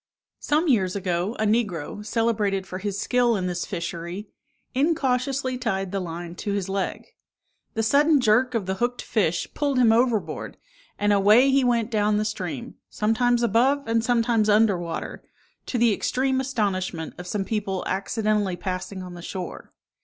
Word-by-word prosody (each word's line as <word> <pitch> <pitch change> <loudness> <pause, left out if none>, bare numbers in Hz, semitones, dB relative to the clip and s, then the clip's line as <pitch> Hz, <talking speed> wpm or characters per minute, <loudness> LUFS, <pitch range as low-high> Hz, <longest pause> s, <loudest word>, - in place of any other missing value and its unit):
Some 310 +4 +1
years 195 -9 +2
ago, 185 +2 -1
a 215 - 0
negro, 210 -4 -1
celebrated 210 -4 0
for 185 0 -6
his 200 0 -3
skill 245 0 +2
in 185 -3 -2
this 175 -1 -3
fishery, 170 +2 -5 0.4
incautiously 265 -3 0
tied 195 -6 -2
the 195 - -1
line 170 -1 -6
to 205 - -3
his 200 -2 -2
leg. 195 -1 -3 0.7
The 225 - 0
sudden 290 +6 +4
jerk 245 +2 +3
of 215 -5 0
the 190 - -1
hooked 245 +1 -1
fish 180 -6 0
pulled 285 -3 0
him 240 -3 +5
overboard, 230 -2 0 0.4
and 205 0 +2
away 210 +7 +5
he 270 0 +3
went 235 -2 +1
down 210 -1 +2
the 215 - 0
stream, 215 +3 -5
sometimes 240 +3 +1
above, 250 +5 +2
and 230 0 +1
sometimes 230 -2 +2
under 210 -1 +5
water, 170 -1 -5 0.4
to 250 - -2
the 235 -2 +4
extreme 260 +4 0
astonishment 190 - -2
of 180 - -7
some 195 +1 -2
people 200 -3 -2
accidentally 205 0 0
passing 185 +1 -5
on 180 -1 -8
the 175 - -9
shore. 180 0 -7
215 Hz, 160 wpm, -24 LUFS, 190-245 Hz, 0.7 s, him